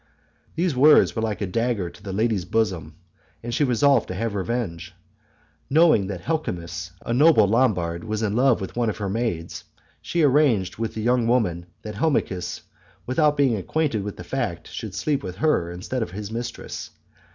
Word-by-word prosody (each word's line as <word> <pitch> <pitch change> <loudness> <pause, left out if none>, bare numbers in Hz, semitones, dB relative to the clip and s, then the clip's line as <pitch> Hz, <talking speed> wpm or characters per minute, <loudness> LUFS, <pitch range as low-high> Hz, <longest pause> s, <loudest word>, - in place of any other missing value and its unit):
These 170 -3 0
words 145 +4 +6
were 110 - -1
like 110 -2 -2
a - - +1
dagger 115 -1 -1
to - - -17
the 100 -1 -6
lady's 105 -1 0
bosom 90 -7 -1 0.5
and 120 0 -4
she 145 - +2
resolved 130 0 +3
to 90 - -5
have 115 +2 -2
revenge. 100 -4 -3 0.7
Knowing 155 - +4
that 95 -3 -5
Helmichis, 90 - -3 0.2
a 115 - -1
noble 145 -4 +6
Lombard, 95 -7 +1
was 110 0 -3
in 105 -1 0
love 125 -2 +3
with 95 - -6
one 120 -2 +1
of 105 - -4
her 100 -2 -3
maids, 100 -6 -3 0.4
she 170 -2 0
arranged 130 -10 +3
with 115 -1 -3
the 110 - -3
young 120 0 +2
woman, 90 -8 +1 0.2
that 105 - -6
Helmichis, 100 - -1 0.4
without 150 +3 +2
being 135 -5 +3
acquainted 115 - -1
with 100 0 -6
the - - -7
fact, - - -3
should - - -6
sleep 145 -3 0
with 90 -1 -6
her 100 - +1
instead 95 +8 -4
of 110 - -2
his 100 +3 -7
mistress. 120 +1 -5
110 Hz, 180 wpm, -24 LUFS, 95-130 Hz, 0.7 s, words